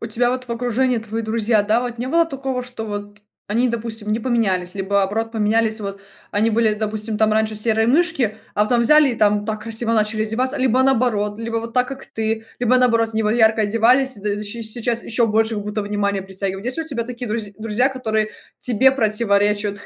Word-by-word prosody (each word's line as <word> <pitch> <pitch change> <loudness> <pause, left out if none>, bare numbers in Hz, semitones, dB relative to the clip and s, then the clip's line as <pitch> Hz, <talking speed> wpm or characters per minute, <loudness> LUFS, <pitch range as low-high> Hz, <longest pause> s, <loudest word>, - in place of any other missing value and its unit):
у 230 - -4
тебя 240 +2 +1
вот 255 0 -3
в 245 - -12
окружении 245 +1 0
твои 225 +1 -4
друзья, 220 -1 +1
да 220 +3 +2
вот, 240 -1 -5
не 245 - -3
было 335 +5 +3
такого, 270 -4 -4
что 245 -3 -7
вот 205 0 -6 0.3
они, 240 +4 +2
допустим, 225 -2 -4
не 220 - 0
поменялись, 195 -7 0
либо 200 +1 -2
наоборот 220 +4 -1
поменялись 220 0 +1
вот, 200 -1 -6 0.3
они 215 +2 +2
были 220 -1 +2
допустим 215 0 -2
там 215 0 +2
раньше 220 0 +1
серые 225 +1 +1
мышки, 275 -7 +2 0.2
а 210 - +3
потом 235 +2 +1
взяли 300 +3 +6
и - - -3
там 205 -1 +2
так 215 -1 -3
красиво 230 +1 0
начали 215 0 +1
одеваться, 255 +6 -1
либо 260 0 +3
наоборот? 225 -6 +1
Либо 230 0 -3
вот 230 0 -4
так, 250 0 +1
как 270 0 -7
ты, 220 0 -3
либо 245 +1 +3
наоборот 230 -3 +3
они 220 - +1
вот 210 - +1
ярко 220 -1 +3
одевались 235 +5 +3
д 205 0 -2
и 210 +1 -5
щ 230 +3 -6
с - - -7
сейчас 235 -1 -2
еще 230 0 +1
больше, 220 +1 +1
как 205 -1 -4
будто 210 0 -3
внимания 200 -1 -1
притягивают. 195 +1 -4
Есть 255 - -1
ли 325 - -2
у - - -12
тебя 235 -7 -2
такие 245 0 -6
друзь 210 -2 -3
друзья, 225 +4 +1
которые 220 -5 -1 0.3
тебе 255 +2 +4
противоречат 210 -3 +1
225 Hz, 220 wpm, -20 LUFS, 210-245 Hz, 0.3 s, взяли